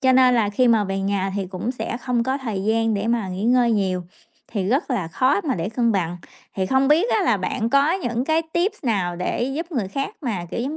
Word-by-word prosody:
Cho 260 Hz, -1 st, +4 dB
nên 255 Hz, -1 st, +5 dB
là 225 Hz, -4 st, +2 dB
khi 245 Hz, +4 st, +2 dB
mà 225 Hz, -3 st, +4 dB
về 195 Hz, 0 st, -2 dB
nhà 195 Hz, 0 st, -1 dB
thì 195 Hz, -, -2 dB
cũng 185 Hz, +5 st, -4 dB
sẽ 245 Hz, -, -4 dB
không 245 Hz, -1 st, -1 dB
có 260 Hz, +3 st, -1 dB
thời 220 Hz, -8 st, -4 dB
gian 225 Hz, 0 st, +1 dB
để 200 Hz, +2 st, -2 dB
mà 230 Hz, -4 st, 0 dB
nghỉ 185 Hz, +3 st, -4 dB
ngơi 240 Hz, -1 st, +4 dB
nhiều, 190 Hz, -3 st, 0 dB, 0.5 s
thì 195 Hz, -4 st, -2 dB
rất 270 Hz, +4 st, 0 dB
là 190 Hz, -10 st, -1 dB
khó 265 Hz, -, +2 dB
mà 275 Hz, -, 0 dB
để 170 Hz, +2 st, -2 dB
cân 235 Hz, +1 st, +1 dB
bằng. 175 Hz, -3 st, -1 dB, 0.4 s
Thì 190 Hz, -1 st, -1 dB
không 265 Hz, +5 st, +2 dB
biết 330 Hz, +10 st, +3 dB
á -, -, +2 dB
là -, -, +3 dB
bạn 230 Hz, -1 st, -2 dB
có 280 Hz, +4 st, +4 dB
những 245 Hz, -10 st, -1 dB
cái 320 Hz, +2 st, +2 dB
tips 380 Hz, +2 st, -1 dB
nào 190 Hz, -7 st, 0 dB
để 180 Hz, +6 st, -2 dB
giúp 335 Hz, +2 st, -5 dB
người 220 Hz, -9 st, -1 dB
khác 275 Hz, +7 st, -4 dB
mà, 210 Hz, -, -3 dB
kiểu, -, -, -3 dB
giống 280 Hz, +6 st, -3 dB
235 Hz, 250 wpm, -22 LUFS, 195-265 Hz, 0.5 s, nên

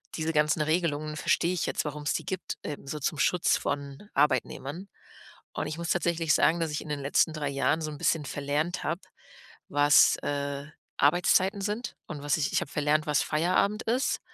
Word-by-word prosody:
Diese 160 Hz, 0 st, -2 dB
ganzen 150 Hz, +1 st, +2 dB
Regelungen 155 Hz, -1 st, -1 dB
verstehe 170 Hz, +3 st, +1 dB
ich 180 Hz, -, -1 dB
jetzt, -, -, -1 dB
warum's 150 Hz, 0 st, -2 dB
die -, -, -3 dB
gibt, 190 Hz, -1 st, -4 dB
ähm, 145 Hz, -2 st, -6 dB
so 150 Hz, -, -4 dB
zum 150 Hz, +1 st, -2 dB
Schutz 175 Hz, +2 st, +3 dB
von 140 Hz, +7 st, -5 dB
Arbeitnehmern. 145 Hz, +5 st, 0 dB, 0.7 s
Und -, -, -3 dB
ich 155 Hz, -, -5 dB
muss 170 Hz, -1 st, -4 dB
tatsächlich 170 Hz, -2 st, +1 dB
sagen, 170 Hz, -, +3 dB
dass 160 Hz, -2 st, -1 dB
ich 150 Hz, -, -2 dB
in -, -, -10 dB
den 150 Hz, -1 st, -2 dB
letzten 145 Hz, +3 st, +2 dB
3 150 Hz, -2 st, -2 dB
Jahren 140 Hz, +3 st, +1 dB
so 155 Hz, -, -3 dB
'n 150 Hz, -, -8 dB
bisschen 155 Hz, +1 st, +1 dB
verlernt 145 Hz, +6 st, -2 dB
habe, 170 Hz, -, -2 dB, 0.7 s
was, 145 Hz, +1 st, +5 dB
äh, 140 Hz, 0 st, -3 dB, 0.3 s
Arbeitszeiten 180 Hz, +6 st, +3 dB
sind 210 Hz, +5 st, -3 dB
und 150 Hz, -4 st, -6 dB
was 145 Hz, +1 st, +1 dB
ich 145 Hz, -, -1 dB
ich -, -, +2 dB
habe 140 Hz, -, -6 dB
verlernt, 150 Hz, +1 st, +1 dB
was 150 Hz, -1 st, +2 dB
Feierabend 180 Hz, +7 st, +1 dB
ist, 250 Hz, +4 st, 0 dB
155 Hz, 190 wpm, -28 LUFS, 145-170 Hz, 0.7 s, was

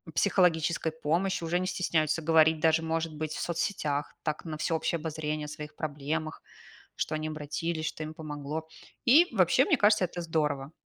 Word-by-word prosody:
психологической 170 Hz, -4 st, +2 dB
помощи, 170 Hz, +4 st, -1 dB
уже 175 Hz, +2 st, 0 dB
не 185 Hz, -, -2 dB
стесняются 160 Hz, -3 st, 0 dB
говорить 160 Hz, 0 st, +4 dB
даже, 160 Hz, 0 st, +3 dB
может 160 Hz, 0 st, -2 dB
быть, 155 Hz, 0 st, -3 dB
в -, -, -5 dB
соцсетях, 155 Hz, -4 st, -2 dB
так, 155 Hz, +1 st, -3 dB
на 155 Hz, -1 st, -5 dB
всеобщее 160 Hz, +1 st, 0 dB
обозрение 155 Hz, -1 st, -3 dB
о -, -, -7 dB
своих 150 Hz, 0 st, -8 dB
проблемах, 155 Hz, +1 st, -3 dB, 0.5 s
что 155 Hz, -, -2 dB
они 155 Hz, 0 st, -3 dB
обратились, 155 Hz, +2 st, -3 dB
что 155 Hz, -, -4 dB
им 155 Hz, +1 st, -6 dB
помогло. 155 Hz, 0 st, -5 dB, 0.4 s
И 310 Hz, +8 st, +7 dB
вообще, -, -, +4 dB
мне 315 Hz, -8 st, +3 dB
кажется, 210 Hz, -3 st, +4 dB
это 175 Hz, 0 st, -6 dB
здорово. 150 Hz, -3 st, -1 dB
160 Hz, 165 wpm, -29 LUFS, 155-170 Hz, 0.5 s, И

